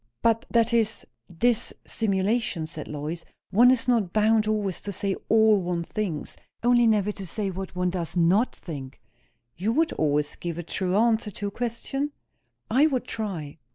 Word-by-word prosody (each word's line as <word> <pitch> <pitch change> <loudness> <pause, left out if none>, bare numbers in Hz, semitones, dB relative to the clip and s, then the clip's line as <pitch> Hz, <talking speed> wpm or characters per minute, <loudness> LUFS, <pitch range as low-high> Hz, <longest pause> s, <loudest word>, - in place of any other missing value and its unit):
"But 230 0 +2
that 235 0 +3
is 225 -2 +1 0.3
_dis_simulation," 205 -2 0
said 155 -2 -7
Lois. 150 +3 -5 0.3
"One 235 +6 +6
is 255 -1 +3
not 225 -8 +2
bound 215 0 +3
always 210 -4 0
to 200 - -5
say 195 0 -1
all 220 -2 +5
one 175 -1 -2
thinks; 170 -5 -3 0.3
only 240 -1 +5
never 210 -2 +2
to 195 -2 -8
say 195 +2 -3
what 190 0 -6
one 180 0 0
does 175 -1 -4
not 185 +8 +3
think." 140 -5 -8 0.6
"You 200 +6 -1
would 320 +4 +2
always 150 -1 0
give 170 -2 -4
a 175 - -4
true 185 +2 -1
answer 225 -1 +2
to 205 +1 -4
a - - -14
question?" 245 +6 -3 0.5
"I 270 +7 +4
would 260 -5 -1
try." 170 -9 -5
205 Hz, 165 wpm, -26 LUFS, 175-230 Hz, 0.6 s, One